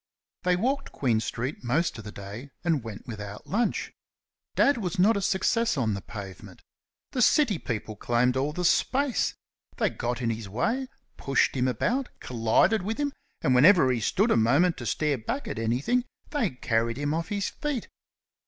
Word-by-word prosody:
They 180 0 +2
walked 270 +9 -1
Queen 120 -5 +1
street 125 +6 -4
most 145 +8 +1
of - - -8
the 105 - -8
day, 105 +8 -8
and 160 -7 +1
went 110 -3 -8
without 105 -3 -7
lunch. 230 +4 -1 0.6
Dad 285 -2 +4
was 180 -5 -3
not 205 +5 +5
a 200 - -1
success 225 +2 +1
on 115 -5 +1
the 100 - -4
pavement. 95 -3 -9 0.5
The 250 - -1
city 235 - +4
people 110 -3 -4
claimed 120 +4 +1
all 135 +3 0
the 180 +3 -3
space. 260 +7 +2 0.4
They - - +1
got 120 +1 -3
in 115 -2 0
his 110 -3 -5
way, 230 - -1 0.3
pushed 135 0 +1
him 130 -1 +1
about, 240 - 0
collided 120 - +2
with 215 +4 -3
him, 285 -1 -1 0.3
and 130 - +3
whenever 145 +1 +6
he 125 - 0
stood 205 - +2
a - - +5
moment 140 +11 +4
to 120 - -5
stare 145 +4 0
back 265 - -4
at - - -4
anything, 130 - +1 0.3
they 290 - +1
carried 115 -3 -1
him 145 +1 -1
off 165 +1 -2
his 200 -1 -1
feet. 290 -6 -3
140 Hz, 180 wpm, -27 LUFS, -, 0.6 s, whenever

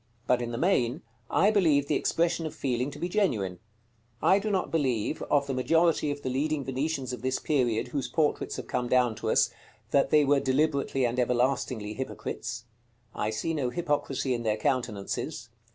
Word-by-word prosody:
But 125 -1 +2
in 120 - -3
the 115 - -3
main, 145 -4 +1 0.3
I 205 - +4
believe 155 -9 +3
the - - +1
expression 165 0 +1
of - - -8
feeling 125 0 -1
to - - -10
be 175 - -2
genuine. 115 - 0 0.6
I 195 - +4
do 215 +2 -3
not 195 -3 0
believe, 135 -4 0
of 140 -1 +3
the 140 - -3
majority 160 +4 +2
of 145 0 -4
the 130 - -1
leading 145 +1 -1
Venetians 135 0 -2
of 125 - -6
this 130 +1 0
period 120 -7 0
whose 140 -3 -2
portraits 155 -2 0
have - - -6
come 125 -1 -2
down 125 -2 +3
to - - -3
us, - - +3 0.4
that 140 - +3
they 150 -1 +5
were 140 0 +4
deliberately 135 -1 +1
and 120 +1 -1
everlastingly 125 -3 0
hypocrites. 120 -2 -5 0.5
I 105 - -1
see 110 +9 -2
no 140 -6 -1
hypocrisy 145 -4 -1
in 120 - -2
their 110 -2 0
countenances. 120 +2 -2
135 Hz, 185 wpm, -28 LUFS, 120-155 Hz, 0.6 s, they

